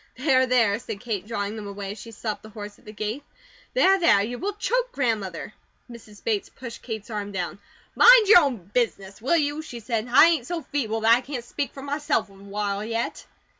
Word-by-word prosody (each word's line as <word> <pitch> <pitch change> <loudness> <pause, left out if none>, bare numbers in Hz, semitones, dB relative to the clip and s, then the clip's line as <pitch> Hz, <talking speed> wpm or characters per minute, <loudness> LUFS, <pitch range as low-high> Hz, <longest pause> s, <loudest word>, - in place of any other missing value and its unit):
"There, 260 -1 +3
there," 230 -4 +3
said 220 -4 -7
Kate, 215 -4 -4
drawing 205 -2 -3
them 215 -2 -7
away 200 -1 -6
as 205 - -9
she 230 - -10
stopped 220 -1 -5
the 215 - -12
horse 210 -1 -9
at - - -25
the 215 - -9
gate. 215 +6 -4 0.5
"There, 390 -6 +5
there, 335 - +5
you 245 +3 -5
will 405 +2 -2
choke - - -1
Grandmother." 215 - -2 0.4
Mrs. 220 -3 -13
Bates 215 -3 -1
pushed 235 -3 -9
Kate's 220 -2 -6
arm 205 -1 -4
down. 185 0 -4 0.4
"Mind 485 -3 +8
your 405 -3 +9
own 280 -7 0 0.2
business, 200 -5 -1
will 280 +8 +2
you?" 295 0 0
she 250 -6 -8
said. 225 0 -2
"I 265 +6 +8
ain't 320 -7 +1
so 340 -3 -3
feeble 225 -6 -2
that 225 +1 +6
I 245 - -1
can't 255 -2 -6
speak 280 +3 -3
for 270 - -10
myself 285 -7 -1
awhile 200 +1 -4
yet." 230 +1 -3
230 Hz, 205 wpm, -25 LUFS, 210-280 Hz, 0.5 s, your